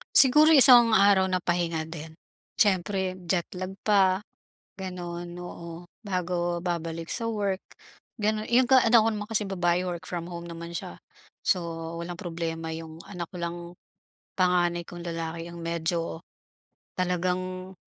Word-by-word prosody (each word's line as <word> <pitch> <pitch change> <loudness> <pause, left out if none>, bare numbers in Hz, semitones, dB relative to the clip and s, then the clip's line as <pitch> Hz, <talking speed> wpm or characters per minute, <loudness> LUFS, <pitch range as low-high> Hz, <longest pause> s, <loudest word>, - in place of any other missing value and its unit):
Siguro, 300 +4 +9
isang 245 -5 +8
araw 195 -1 +5
na 185 -1 -1
pahinga 170 -2 0
din. 160 -1 -8 0.4
Siyempre, 190 -2 +1
jetlag 185 +2 -2
pa, 195 -1 +3 0.6
gano'n, 175 -2 -6 0.2
oo, 170 0 -9 0.2
bago 175 -2 -2
babalik 165 -2 -4
sa 230 - -2
work, 205 -4 -1 0.6
gano'n. 215 -1 -1
Eh, 245 +2 +4
yung 250 - -3
ga 265 - +8
yung 240 -1 +2
anak 230 - +9
ko 225 - +2
naman 210 -1 -4
kasing 210 -2 -1
babae, 175 -1 +1
work 180 0 -5
from 175 0 -5
home 170 0 -7
naman 170 0 -8
siya. 120 - -7 0.4
So, 185 - +2 0.4
walang 170 +1 -5
problema 165 -2 -5
yung 160 0 -8
anak 175 -3 -5
ko 180 - -12
lang, 170 0 -3 0.8
panganay 175 -2 +2
kong 175 0 -9
lalaki 165 0 -4
ang 170 -1 -9
medyo 165 0 -2 0.8
talagang 185 +1 -2
180 Hz, 145 wpm, -27 LUFS, 170-195 Hz, 0.8 s, Siguro